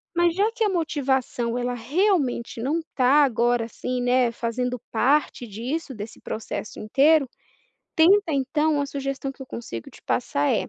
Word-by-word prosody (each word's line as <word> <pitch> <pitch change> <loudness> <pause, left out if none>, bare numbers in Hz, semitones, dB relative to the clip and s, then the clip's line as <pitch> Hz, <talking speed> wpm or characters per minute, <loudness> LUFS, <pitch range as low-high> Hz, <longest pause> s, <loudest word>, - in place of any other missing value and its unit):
Mas 345 0 +3
já 410 +3 +3
que 470 - -1
a 425 - +3
motivação, 265 -8 -1
ela 245 0 -1
realmente 270 - 0
não 290 +7 0 0.2
tá 275 +3 +5
agora, 240 -2 +2
assim, 250 +2 -4
né, 245 -1 +3
fazendo 245 +2 -2
parte 265 +2 +1
disso, 255 - -4
desse 215 0 -8
processo 220 -1 -6
inteiro, 275 +5 +3 0.7
tenta 370 +2 +5
então 295 +3 +1
uma 285 -1 0
sugestão 275 -1 -4
que 270 - -11
eu - - -10
consigo 115 - -7
te - - -16
passar 145 +1 0
é, - - -1
265 Hz, 155 wpm, -24 LUFS, 240-305 Hz, 0.7 s, tá